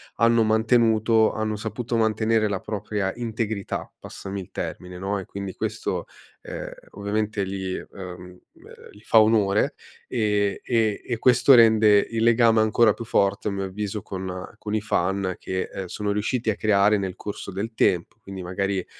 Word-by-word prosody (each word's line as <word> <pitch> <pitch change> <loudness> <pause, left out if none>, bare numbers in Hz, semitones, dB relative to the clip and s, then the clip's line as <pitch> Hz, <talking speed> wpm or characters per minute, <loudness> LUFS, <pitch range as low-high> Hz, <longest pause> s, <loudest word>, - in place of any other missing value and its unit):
hanno 115 0 +4
mantenuto 110 0 +3
hanno 110 0 -2
saputo 115 +2 -4
mantenere 110 0 +2
la 100 -2 -2
propria 105 -2 -3
integrità, 110 -3 -4
passami 100 +1 -7
il 90 - -12
termine, 90 0 -6
no, 100 +1 -2
e 95 - -7
quindi 100 -1 -6
questo, - - -3 0.4
ehm, - - -7 0.2
ovviamente 105 0 -2
li 95 -1 -4
uhm, - - -11 0.6
ehm, - - -15
li 105 - -17
fa 110 - +5
onore, 105 -2 +2 0.3
ehm 105 -4 +1
e 110 -4 +1
e 120 -2 -2
questo 125 +2 +5
rende 110 -3 +6
il 115 -1 -2
legame 115 -1 +5
ancora 110 0 +4
più 115 - -8
forte 100 0 +1
a - - -3
mio 100 0 -3
avviso 105 +2 -4
con 95 -1 -6
con 105 - -5
i 110 - 0
fan 95 -2 -1
che, 95 0 -3
ehm, 95 - -4
sono 105 +3 -3
riusciti 110 +3 -1
a 100 - -3
creare 105 0 +3
nel 95 -2 -4
corso 100 -1 -7
del 105 +5 -4
tempo. 90 +3 +1
Quindi 95 -3 -8
magari 95 +1 -2
105 Hz, 165 wpm, -24 LUFS, 100-110 Hz, 0.6 s, rende